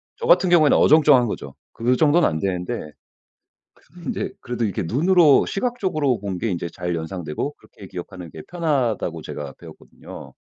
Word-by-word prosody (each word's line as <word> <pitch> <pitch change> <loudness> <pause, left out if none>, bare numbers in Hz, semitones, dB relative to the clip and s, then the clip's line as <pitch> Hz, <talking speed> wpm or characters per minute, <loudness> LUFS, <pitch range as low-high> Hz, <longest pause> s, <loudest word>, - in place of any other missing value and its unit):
저 470 - -6
같은 465 - +4
경우에는 160 -4 +5
어정쩡한 145 -5 +5
거죠. 70 -10 -6 0.2
그 120 +2 +1
정도는 155 +4 +4
안 80 - -2
되는데 90 -4 -3 0.8
그래도 175 +5 -19
인제 - - -3
그래도 120 -1 -2
이렇게 100 - -2
눈으로 155 - +4
시각적으로 185 - -1
본 95 -2 -5
게 115 - -1
인제 85 -2 -3
잘 90 0 -4
연상되고 85 - -4
그렇게 100 - -15
기억하는 90 -1 -8
게 80 - -9
편하다고 130 - -1
제가 75 -2 -7
배웠거든요. - - -12
120 Hz, 390 characters per minute, -22 LUFS, -, 0.8 s, 경우에는